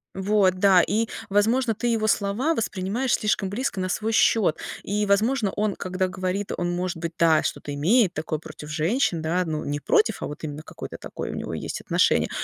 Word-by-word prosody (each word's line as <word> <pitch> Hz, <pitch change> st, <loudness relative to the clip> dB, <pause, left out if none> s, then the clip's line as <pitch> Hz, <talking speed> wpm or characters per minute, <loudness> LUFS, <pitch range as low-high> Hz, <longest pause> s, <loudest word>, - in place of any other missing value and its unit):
Вот, 190 Hz, -1 st, +2 dB
да, 185 Hz, -1 st, +5 dB
и, 225 Hz, +6 st, 0 dB, 0.2 s
возможно, 225 Hz, +4 st, +2 dB
ты 240 Hz, -, -2 dB
его 225 Hz, -2 st, +1 dB
слова 220 Hz, +10 st, +1 dB
воспринимаешь 220 Hz, +3 st, -1 dB
слишком 205 Hz, -2 st, +1 dB
близко 210 Hz, 0 st, -2 dB
на 185 Hz, 0 st, -1 dB
свой 220 Hz, +4 st, -1 dB
счет, 215 Hz, -5 st, +3 dB, 0.3 s
и, 210 Hz, +1 st, -1 dB
возможно, 210 Hz, +2 st, +2 dB
он, 210 Hz, -1 st, 0 dB
когда 185 Hz, 0 st, -2 dB
говорит, 185 Hz, +2 st, -3 dB
он, 175 Hz, 0 st, -1 dB
может 175 Hz, 0 st, -2 dB
быть, 165 Hz, 0 st, -4 dB
да, 160 Hz, -2 st, +4 dB
что-то 145 Hz, -, -3 dB
имеет 185 Hz, -, +3 dB
такое 155 Hz, -1 st, -3 dB
против 150 Hz, -1 st, -10 dB
женщин, 170 Hz, -, +1 dB
да, 170 Hz, +3 st, 0 dB
ну, 155 Hz, -2 st, -3 dB
не 145 Hz, +1 st, -2 dB
против, 215 Hz, +8 st, +2 dB
а -, -, -2 dB
вот 145 Hz, -, -9 dB
именно 150 Hz, 0 st, -5 dB
какое-то -, -, -8 dB
такое -, -, -6 dB
у -, -, -6 dB
него -, -, -5 dB
есть -, -, -4 dB
отношение, -, -, +2 dB
195 Hz, 195 wpm, -24 LUFS, 170-215 Hz, 0.3 s, да